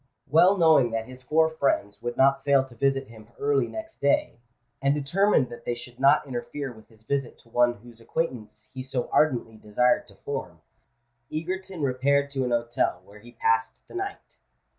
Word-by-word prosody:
Well 180 +6 +5
knowing 160 -8 +5
that 115 0 -1
his 130 +1 -12
four 160 +5 +3
friends 140 -10 -1
would 120 0 -4
not 135 0 +4
fail 140 -2 +4
to 130 - -15
visit 135 +3 0
him 110 -2 -14
early 140 -3 +1
next 330 0 -8
day,—and 120 0 -1
determined 150 -1 +2
that 120 0 -10
they 120 - -2
should 120 0 -11
not 135 +2 +5
interfere 135 +2 -5
with 110 -1 -17
his 110 -1 -20
visit 135 +1 -2
to 115 - -24
one 120 +1 +3
whose 115 +1 -16
acquaintance 115 -7 -4
he 130 - -5
so 130 -1 -3
ardently 120 -7 +1
desired 125 - +1
to - - -16
form,—Egerton 130 - -7
repaired 140 +2 +1
to 135 -2 -1
an 125 - -1
hotel, 120 0 0
where 105 +1 -15
he 120 +2 -15
passed 115 -1 0
the - - -15
night. 390 +2 -6
130 Hz, 175 wpm, -26 LUFS, 120-140 Hz, -, Well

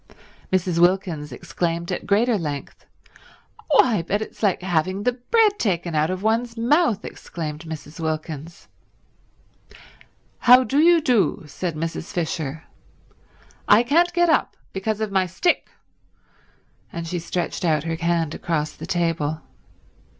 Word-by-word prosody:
Mrs. 180 -2 +1
Wilkins 175 -5 +1
exclaimed 170 +7 -3
at 180 - -4
greater 225 +4 +3
length. 150 -7 -5 0.8
"Why, 245 - +4
but 195 +5 -1
it's 220 - -8
like 195 -4 +1
having 185 +2 0
the 250 - +3
bread 415 - +2
taken 175 -5 -1
out 155 +1 +2
of 185 +1 -3
one's 230 +2 0
mouth!" 240 - +2
exclaimed 155 -1 -6
Mrs. 160 0 -8
Wilkins. 160 0 -5 1.7
"How 250 +1 +7
do 275 +3 0
you 335 +1 +6
do," 245 - +2
said 170 +2 -4
Mrs. 165 +1 -4
Fisher. 160 -3 -3 1.0
"I 210 +3 +6
can't 335 +8 +3
get 345 0 +3
up 325 - +1 0.2
because 210 +3 -2
of 215 -2 -2
my 190 -1 +2
stick." 190 - 0 1.2
And 170 0 -5
she 175 +1 -2
stretched 175 +2 -3
out 155 -4 +2
her 165 0 -2
hand 170 -2 0
across 155 -3 -2
the - - -10
table. 165 -4 -1
180 Hz, 135 wpm, -23 LUFS, 165-225 Hz, 1.7 s, How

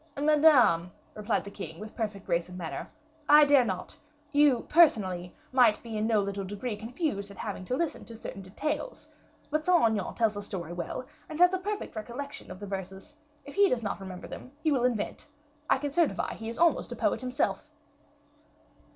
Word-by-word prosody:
"Madame," 285 - +5 0.2
replied 210 +1 -1
the 200 - -9
king, 165 -5 -7
with 215 +1 -9
perfect 210 -4 -4
grace 170 -1 0
of 180 - -9
manner, 170 -3 -5 0.4
"I 300 0 +9
dare 285 -3 +6
not 190 -5 -4 0.4
you, 290 -4 +4
personally, 190 - +3 0.2
might 245 -5 +4
be 230 -2 -6
in 215 +1 0
no 220 -2 +3
little 200 0 -3
degree 205 +4 -4
confused 225 - -3
at 200 - -12
having 200 -4 -5
to 255 - -1
listen 335 -1 -2
to 230 - -10
certain 195 -3 -7
details 295 - -4 0.4
but 305 +1 0
Saint 355 0 +4
Aignan 220 -2 0
tells 225 -3 +2
a 205 - -4
story 175 -4 -5
well, 175 +8 -4 0.2
and 310 - -6
has 360 +1 +6
a 375 - 0
perfect 415 - -4
recollection 245 +6 -7
of 185 0 -8
the 205 - -6
verses. 190 +5 -7 0.3
If 285 - -9
he 400 -1 +5
does 235 -2 0
not 200 - -3
remember 185 -2 -8
them, 255 - -9
he 315 - +3
will 255 -4 +2
invent. 235 -5 -2 0.4
I - - +5
can 285 +1 -3
certify 330 +1 +1
he 225 0 -6
is 230 - -6
almost 340 -1 +2
a - - -4
poet - - 0
himself." 255 0 -1
225 Hz, 195 wpm, -29 LUFS, 195-290 Hz, 0.4 s, I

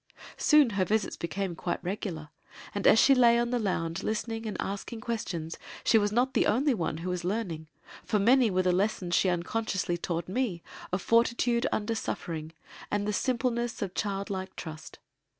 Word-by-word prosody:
Soon 300 -6 +5
her 195 -2 +1
visits 210 +3 0
became 185 +1 -3
quite - - -2
regular 175 -5 -4 0.4
and 205 - +1
as - - +7
she 275 - +7
lay 240 -2 +5
on 240 0 0
the 245 - +1
lounge 185 -4 -1
listening 225 +1 -3
and 210 - -4
asking 200 +3 -4
questions 180 -8 -4 0.2
she 225 - +5
was 205 0 +1
not 250 +4 +1
the - - +3
only 265 +6 +3
one 165 -7 -2
who 170 +3 -4
was 180 -1 -3
learning 180 -5 -3 0.4
for 215 - 0
many 240 +3 +5
were 185 -1 +1
the 180 - +3
lessons 185 -1 0
she 185 - +4
unconsciously 180 0 -1
taught 170 -1 -3
me 190 -4 -2 0.3
of 185 0 -1
fortitude 235 +1 +2
under 220 +2 -1
suffering, 160 -7 -4 0.4
and 205 0 -1
the 210 - 0
simpleness 240 -2 -1
of 190 -2 -5
childlike 195 -2 -3
trust. 160 -1 -8
205 Hz, 175 wpm, -29 LUFS, 180-230 Hz, 0.4 s, as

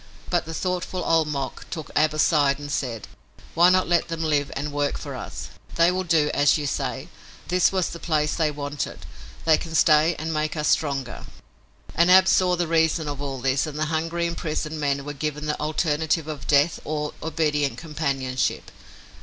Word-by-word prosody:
But - - +1
the 165 - -6
thoughtful 180 0 -2
Old 165 -2 +3
Mok 140 -3 -4
took 160 -2 -6
Ab 155 0 +3
aside 145 -2 +3
and 145 0 -7
said: 120 -7 -3 0.5
"Why 175 +2 +6
not 185 0 +3
let 175 0 +2
them 165 -1 -4
live 145 -3 0
and 145 +2 -3
work 145 0 -1
for - - -7
us? - - -7 0.3
They 170 +1 +4
will 185 +1 -1
do 160 -4 +2
as 145 +1 +4
you 150 - -3
say. 135 +1 -3 0.4
This 180 +1 +3
was 190 -2 0
the 170 - -8
place 150 -3 0
they 160 -3 +1
wanted. 145 -1 -5 0.4
They 160 -1 +5
can 165 -1 -6
stay 155 +1 +4
and 160 +1 -3
make 155 +1 -1
us 150 - 0
stronger." 135 -5 -1 0.7
And 170 +2 +3
Ab 185 +1 +7
saw 180 -1 +3
the 175 -1 -1
reason 160 -1 +2
of 145 -1 -4
all 135 -2 -4
this 135 +3 +1
and 150 -1 -6
the 155 - 0
hungry, 165 +2 -1
imprisoned 160 -2 -3
men 140 -1 -1
were 145 - -5
given 150 +1 -4
the 150 0 -2
alternative 155 +1 0
of 150 -3 -6
death 145 +3 +3
or 150 -1 -3
obedient 150 -3 0
companionship. 140 -5 -2
155 Hz, 185 wpm, -24 LUFS, 145-165 Hz, 0.7 s, Ab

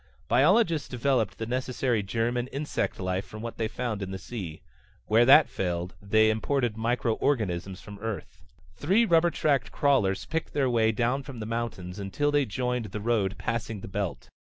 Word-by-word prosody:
Biologists 160 - +3
developed 125 -5 0
the 115 - -3
necessary 125 -1 0
germ 115 +4 -1
and 125 +1 -2
insect 145 +2 -2
life 95 0 -1
from 110 +1 -10
what 115 - -6
they 110 - 0
found 115 -2 -3
in 95 - -4
the 95 - -4
sea. 95 -7 -7 0.4
Where 115 +3 +4
that 150 +3 +8
failed, 90 -1 -3
they 110 +2 +4
imported 120 +1 0
microorganisms 110 -5 -1
from 105 -2 -10
Earth. 105 -7 -6 0.3
Three 195 +10 +3
rubber 170 -3 +4
tracked 140 -7 0
crawlers 125 -11 +2
picked 165 0 -3
their 135 -3 +1
way 110 -2 +3
down 120 +4 0
from 135 -3 -9
the 110 - -4
mountains 105 -5 -4
until 125 +10 -1
they 145 -2 +2
joined 125 +1 -2
the 105 +1 -6
road 105 -3 0
passing 115 -3 -3
the - - -7
belt. 95 -9 -4
115 Hz, 175 wpm, -27 LUFS, 100-130 Hz, 0.4 s, that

